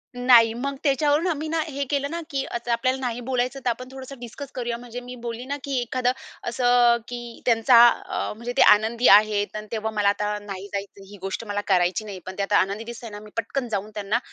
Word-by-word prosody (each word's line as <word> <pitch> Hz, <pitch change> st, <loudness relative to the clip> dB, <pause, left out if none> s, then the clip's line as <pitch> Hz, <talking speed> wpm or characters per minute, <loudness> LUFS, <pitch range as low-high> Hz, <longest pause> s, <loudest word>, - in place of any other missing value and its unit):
नाही 240 Hz, -2 st, +6 dB
मग 275 Hz, +4 st, -3 dB
त्याच्यावरून 295 Hz, +3 st, +2 dB
आम्ही 315 Hz, -2 st, -2 dB
ना, 325 Hz, +1 st, -1 dB
हे 280 Hz, -1 st, -3 dB
केलं 280 Hz, -1 st, 0 dB
ना 335 Hz, -, -3 dB
की 275 Hz, -3 st, -1 dB
आता 235 Hz, 0 st, -4 dB
आपल्याला 255 Hz, +3 st, +1 dB
नाही 245 Hz, -2 st, -3 dB
बोलायचं, 255 Hz, +1 st, -1 dB
तर 245 Hz, -, +3 dB
आपण 255 Hz, +2 st, -4 dB
थोडंसं 265 Hz, -1 st, -9 dB
डिस्कस 250 Hz, +3 st, -8 dB
करूया, 240 Hz, -2 st, -2 dB
म्हणजे 245 Hz, 0 st, -8 dB
मी 250 Hz, 0 st, -9 dB
बोलली 235 Hz, 0 st, -6 dB
ना 280 Hz, +2 st, -3 dB
की 275 Hz, -2 st, -2 dB
एखादं 250 Hz, +1 st, 0 dB, 0.4 s
असं 245 Hz, -1 st, +4 dB
की 240 Hz, -1 st, -8 dB
त्यांचा 235 Hz, +1 st, +5 dB
अ, -, -, -3 dB
म्हणजे 235 Hz, +3 st, -6 dB
ते -, -, +5 dB
आनंदी 225 Hz, +3 st, +5 dB
आहेत 205 Hz, 0 st, +5 dB
आणि 215 Hz, 0 st, -6 dB
तेव्हा 220 Hz, -1 st, -2 dB
मला 210 Hz, -2 st, +2 dB
आता 210 Hz, +1 st, -1 dB
नाही 195 Hz, -1 st, -7 dB
जायचं, 200 Hz, 0 st, -6 dB
ही 205 Hz, -, -10 dB
गोष्ट 195 Hz, +4 st, -4 dB
मला 205 Hz, -1 st, -2 dB
करायची 185 Hz, +2 st, +2 dB
नाही. 195 Hz, -3 st, -7 dB
पण 185 Hz, 0 st, -7 dB
ते 200 Hz, -, 0 dB
आता 205 Hz, +1 st, +2 dB
आनंदी 200 Hz, +4 st, 0 dB
दिसतंय 235 Hz, 0 st, -8 dB
ना, 205 Hz, -1 st, -8 dB
मी 210 Hz, 0 st, -13 dB
पटकन 245 Hz, +3 st, -2 dB
जाऊन 205 Hz, 0 st, -3 dB
त्यांना 210 Hz, +3 st, 0 dB
235 Hz, 220 wpm, -24 LUFS, 210-255 Hz, 0.4 s, नाही